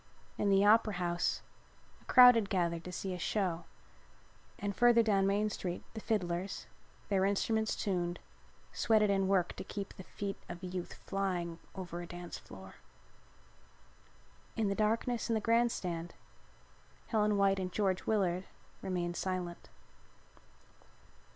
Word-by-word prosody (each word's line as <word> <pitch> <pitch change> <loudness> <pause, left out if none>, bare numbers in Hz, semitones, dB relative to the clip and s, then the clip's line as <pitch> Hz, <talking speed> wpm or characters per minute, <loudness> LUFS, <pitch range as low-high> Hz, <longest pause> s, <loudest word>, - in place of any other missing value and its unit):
In 205 - 0
the 195 0 +5
Opera 215 0 +5
House 175 -1 -1 0.6
a - - -23
crowd 250 -2 +9
had 225 -4 0
gathered 170 -4 0
to 180 - -6
see 185 +1 -4
a 180 - -5
show 175 -4 -1 0.9
and 200 -1 -3
further 240 0 +5
down 195 -3 +3
Main 210 +2 +1
Street 180 -3 -4
the 220 - -6
fiddlers, 190 -4 -2 0.4
their 195 -2 +2
instruments 220 +3 +1
tuned, 175 -3 -1 0.6
sweated 215 -3 +3
and 195 -1 +1
worked 185 -3 +1
to - - -5
keep 200 -1 -6
the 185 - -10
feet 200 +1 -5
of 175 - -8
youth 180 -1 -5
flying 180 -4 -2 0.2
over 175 -2 -5
a 175 - -7
dance 175 0 -7
floor. - - -12 1.8
In 220 -3 +1
the - - +1
darkness 225 +3 0
in 230 - +2
the - - +2
grand 230 +2 +3
stand 170 -3 -4 0.9
Helen 210 -2 +2
White 195 -1 +3
and 185 -1 -3
George 190 -2 0
Willard 190 -4 +1 0.4
remained 175 -2 -2
silent. 180 -2 -4
195 Hz, 140 wpm, -33 LUFS, 180-210 Hz, 1.8 s, crowd